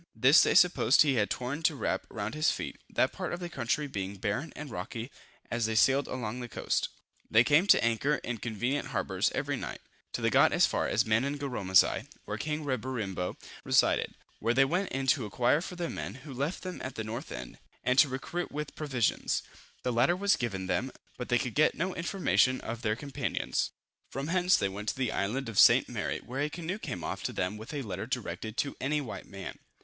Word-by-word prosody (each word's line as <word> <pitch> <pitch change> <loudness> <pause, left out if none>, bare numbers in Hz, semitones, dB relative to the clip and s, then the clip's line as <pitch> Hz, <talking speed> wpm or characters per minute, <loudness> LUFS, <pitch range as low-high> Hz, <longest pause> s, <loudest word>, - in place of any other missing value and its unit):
This 135 +5 +7
they - - +3
supposed 155 -8 +6
he 145 -3 +2
had 105 -5 +1
torn 130 +5 -3
to 160 -2 +2
wrap 100 -6 -2
round 105 +1 -4
his 155 +1 +2
feet; - - -4
that - - +2
part - - -4
of 175 - -3
the 175 -1 -5
country 145 -1 -1
being 100 -7 -4
barren 105 - -2
and 150 -3 -7
rocky. 115 +3 -5 0.4
As 115 -1 +1
they 110 - -2
sailed 135 +5 +4
along 125 -1 -4
this 120 -1 -6
coast, - - -1 0.4
they 115 +2 +6
came 150 +8 +4
to - - +6
anchor 115 +6 +2
in 120 -5 -4
convenient 120 +5 -2
harbors - - 0
every - - -1
night, - - -5 0.3
till - - -4
they - - +3
got - - +5
as - - +5
far - - 0
as 110 - +2
Manangaromasigh, 120 -4 +2 0.2
where - - -4
king 150 0 -3
Reberimbo 115 -8 -2 0.3
resided, - - +2 0.2
where 115 +2 +1
they 135 +1 +6
went 180 +7 0
in 135 0 -2
to 135 -1 +3
inquire 120 - +2
for 180 - -6
their 175 -1 -2
men, - - -5
who 140 - -7
left 140 +7 -3
them 185 -1 -6
at 130 - -5
the 110 - -3
north 115 +7 -6
end, - - -7 0.2
and 125 +1 +3
to 150 - +7
recruit 150 +7 -4
with 150 0 -5
provisions. 135 -7 0 0.4
The 125 - 0
latter 125 +9 +3
was 200 +2 +3
given 100 -6 -3
them, 130 +7 -1 0.2
but 125 - -6
they 120 - +4
could 125 -2 -3
get 155 - +3
no 185 +2 -1
information 170 -7 +2
of 115 0 -5
their 110 -2 +1
companions. 140 +3 -2 0.4
From 135 +4 -4
hence 180 +1 +4
they 100 - +1
went 100 +2 -4
to - - -2
the 125 -4 0
island 115 +7 -1
of 110 -3 -1
St. - - +7
Mary, - - -2
where 130 +3 -4
a 150 - 0
canoe 175 +5 -4
came 90 - -5
off - - -4
to - - -2
them 90 +4 -2
with 110 +2 -9
a 145 -3 -3
letter 100 -1 -5
directed 110 -2 -4
to 140 - -1
any 150 +3 +1
white 135 -6 -7
man. 95 -1 -8
130 Hz, 215 wpm, -30 LUFS, 110-150 Hz, 0.4 s, This